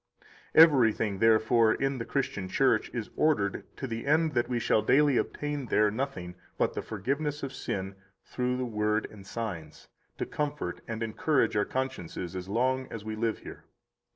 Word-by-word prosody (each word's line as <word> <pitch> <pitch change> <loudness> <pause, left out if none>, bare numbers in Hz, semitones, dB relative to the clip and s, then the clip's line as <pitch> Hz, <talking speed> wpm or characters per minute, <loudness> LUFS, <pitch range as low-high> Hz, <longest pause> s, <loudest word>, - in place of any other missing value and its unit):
55 - - -29
Everything, 115 -9 +3
therefore, 110 +1 +4
in 135 -1 -1
the 115 - -4
Christian 130 -6 -2
Church 125 0 +2
is 115 -3 -5
ordered 110 -11 +1
to - - -4
the 115 0 -5
end 155 +1 +3
that 120 - 0
we 125 - 0
shall 110 -2 +2
daily 140 +5 +4
obtain 145 0 -2
there 105 -1 +3
nothing 110 -8 -4 0.2
but - - +1
the - - -3
forgiveness 140 +8 -3
of 135 -1 -4
sin 95 -6 -4 0.3
through 125 0 -1
the 130 - -1
Word 105 -1 0
and 100 -2 -13
signs, 90 -10 -6 0.3
to - - -2
comfort 145 -11 -3
and 115 0 -3
encourage 115 +2 +1
our 105 - +2
consciences 95 -9 -4
as 90 0 -6
long 130 +4 +1
as 110 -2 -7
we 110 0 -4
live 115 0 -1
here. - - -10
115 Hz, 175 wpm, -29 LUFS, 105-135 Hz, 0.3 s, therefore